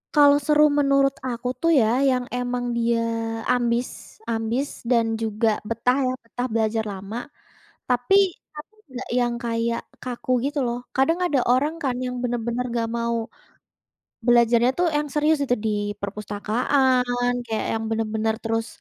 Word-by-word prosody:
Kalau 285 -1 +7
seru 300 0 +5 0.2
menurut 275 -1 +3
aku 245 0 -4
tuh 335 0 +3
ya, 220 - +3 0.2
yang 250 -1 0
emang 245 0 -2
dia 235 0 +1 0.5
ambis 240 0 +1 0.4
ambis 230 +5 -1 0.2
dan 235 -2 +4 0.2
juga 220 +1 0 0.2
betah 245 +3 +1
ya, 255 - 0
betah 245 +2 -4
belajar 220 0 +1
lama. 195 +4 -7 0.7
Tapi 250 +9 +2 0.5
tapi 435 - -33 0.2
nggak 250 - -6
yang 240 -1 +1
kayak 230 0 -1 0.2
kaku 250 0 -6 0.2
gitu 290 0 -4
loh, 240 0 -2 0.2
kadang 325 +6 +3
ada 290 -5 +1
orang 285 +5 +2
kan 270 -3 +1
yang 250 0 -3
bener-bener 240 0 -1
nggak 230 -1 -1
mau, 235 0 0 1.1
belajarnya 240 0 +4
tuh 355 0 +2
yang 295 0 0
serius 300 +1 +2
itu 245 -2 +1
di - - +2 0.3
perpustakaan, 245 +5 0
kayak 220 -2 -2
yang 225 - -2
bener-bener 220 0 -1
terus, 225 0 -1
245 Hz, 145 wpm, -23 LUFS, 230-260 Hz, 1.1 s, Kalau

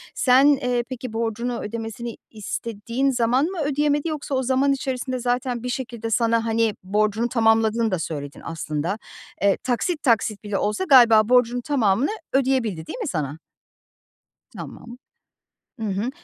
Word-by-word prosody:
Sen, 260 +2 +5
eee, 250 -4 +2
peki 250 -2 -6
borcunu 230 +2 -2
ödemesini 225 +2 -5
istediğin 230 +4 -3
zaman 245 +3 +2
mı 365 0 -4
ödeyemedi 295 +2 +1
yoksa 295 -3 -3
o 260 - 0
zaman 265 +2 +2
içerisinde 260 -1 -3
zaten 245 0 -1
bir 250 - -3
şekilde 235 -3 -4
sana, 230 0 +2
hani, 225 -2 +1
borcunu 215 +4 0
tamamladığını 225 -1 +2
da 185 - 0
söyledin 145 -3 -5
aslında. 165 +4 -3 0.4
Eee, 200 -1 +3
taksit, 285 +6 -1
taksit, 220 -4 +1
bile 205 -2 -2
olsa 210 - -1
galiba 235 - +6
borcunu 245 -1 +3
tamamını 240 - +1 0.2
ödeyebildi 250 -11 +1
değil - - -6
mi - - -3
sana? 150 -2 -3 1.1
Tamam. 240 +1 -10 0.8
Hı 220 - -3
hı 200 +5 -1
235 Hz, 140 wpm, -23 LUFS, 215-260 Hz, 1.1 s, galiba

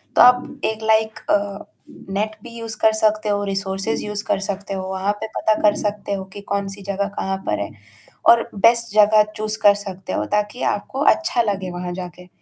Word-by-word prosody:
तो - - +6
आप 250 +3 +5
एक 220 0 -2
लाइक 220 0 +2
अ, 200 0 0 0.4
नेट 215 +2 -2
भी 240 - -10
यूज़ 225 -2 -5
कर 220 - +6
सकते 215 0 +1
हो, 205 0 +1
रिसोर्सेस 195 +2 -2
यूज़ 210 0 -3
कर - - +1
सकते 200 0 -4
हो, 190 - -3
वहाँ 190 +2 0
पे 220 - -3
पता 220 - +3
कर 210 -1 +4
सकते 205 -1 -3
हो 190 -1 -3
कि 205 - -8
कौन-सी 200 0 -3
जगह 200 +1 -1
कहाँ 190 0 -1
पर 105 - 0
है, 100 - -4 0.6
और 235 0 +6
बेस्ट 235 +2 +3
जगह 215 0 +6
चूज़ 215 0 -2
कर 205 -1 +7
सकते 195 -2 -7
हो - - 0
ताकि 210 +4 -1
आपको 265 +6 -6
अच्छा 325 -7 0
लगे 195 -4 -2
वहाँ 175 0 -5
जाके। 180 0 -8
205 Hz, 200 wpm, -21 LUFS, 195-220 Hz, 0.6 s, कर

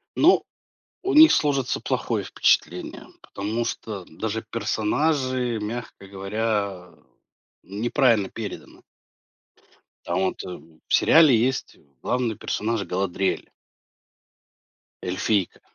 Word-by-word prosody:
Но - - +5 0.6
у 390 - -1
них 315 +1 +9
сложится 140 -4 +1
плохое - - -1
впечатление, - - 0 0.2
потому 110 +4 -3
что 105 -5 -5
даже 110 +6 -4
персонажи, 125 +3 0
мягко 105 -2 -6
говоря, 100 -2 -3 0.7
неправильно 110 0 +1
переданы. 110 -3 -8 1.2
Там 85 +1 -1
вот, 95 - -1
э, - - -8 0.4
в - - -3
сериале 155 -6 +6
есть, 125 +3 -1
э, - - -25 0.2
главный 125 -4 -1
персонаж 110 -1 -2
Галадриэль 95 0 -2 1.5
эльфийка. 95 +1 -1
110 Hz, 95 wpm, -24 LUFS, 100-125 Hz, 1.5 s, них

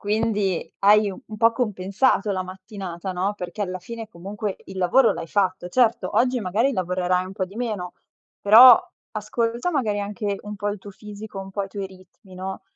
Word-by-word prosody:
Quindi 210 -3 -1
hai 205 0 +5
un 185 - -9
un 215 - -8
po' 230 +1 +4
compensato 210 -1 0
la 185 -1 -1
mattinata, 185 -1 -7
no, 190 +3 -1
perché 180 +2 -5
alla 185 -2 -3
fine 225 +4 -8
comunque 200 +2 -5
il 190 - -10
lavoro 225 +8 +4
l'hai - - -6
fatto. 185 -3 0
Certo, 235 +3 +2
oggi 250 0 +2
magari 220 +8 +1
lavorerai 180 -2 0
un 185 - -8
po' 195 -1 -2
di 190 +2 -14
meno, 210 -7 -3 0.5
però 230 +4 +9 0.3
ascolta 230 +7 -2
magari 220 -9 0
anche 205 0 -3
un 210 0 -7
po' 205 +1 -2
il 205 0 -3
tuo 200 - -11
fisico, 210 0 -10
un 195 0 -7
po' 200 +1 -2
i 195 - -6
tuoi 200 0 -5
ritmi, 190 +1 -17
no. 190 +1 -6
200 Hz, 190 wpm, -23 LUFS, 185-220 Hz, 0.5 s, però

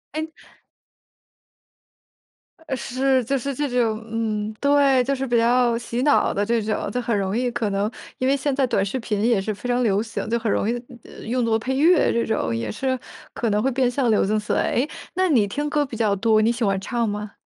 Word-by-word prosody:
诶。 315 +1 -2 2.4
呃， 265 - -1
是， 260 +1 0
就 275 +3 0
是 275 +2 -3
这 290 +2 -1
种 230 -3 0
嗯， 215 -2 -2
对， 280 -2 +4
就 275 +2 0
是 270 +1 -3
比 240 -1 +2
较 240 0 +3
洗 235 +1 -3
脑 290 - +3
的 205 +1 0
这 230 0 +1
种， 215 -1 -2
就 250 - -2
很 230 -3 0
容 195 +2 -1
易 250 0 0
可 230 -3 -1
能， 200 +3 -1 0.3
因 255 - +1
为 280 +1 +3
现 275 -1 -1
在 270 -1 +2
短 195 -3 +1
视 255 +7 -3
频 210 -3 -2
也 230 -4 +3
是 215 +2 -2
非 245 - -7
常 245 0 +1
流 205 -2 +2
行， 225 -1 -5
就 235 - +1
很 225 -2 -2
容 210 - 0
易 - - +1 0.5
用 245 +1 0
作 225 -1 +2
配 260 +4 -3
乐 330 +5 +4
这 235 - +1
种， 210 - -1
也 115 -2 -3
是 260 -1 -1 0.4
可 230 - -1
能 210 +1 +1
会 270 - +1
变 255 0 +2
相 250 -1 0
流 210 - +3
行 215 +2 +1
起 210 - -3
来。 - - +2
诶， 260 +5 +1 0.3
那 375 0 +2
你 230 -10 +3
听 290 +8 -3
歌 295 -1 +1
比 235 -4 -8
较 210 -3 +2
多， 215 +1 +3
你 225 +2 +3
喜 235 0 -3
欢 195 -2 +1
唱 235 +2 -1
吗？ 210 0 -5
235 Hz, 245 characters per minute, -23 LUFS, 215-260 Hz, 2.4 s, 对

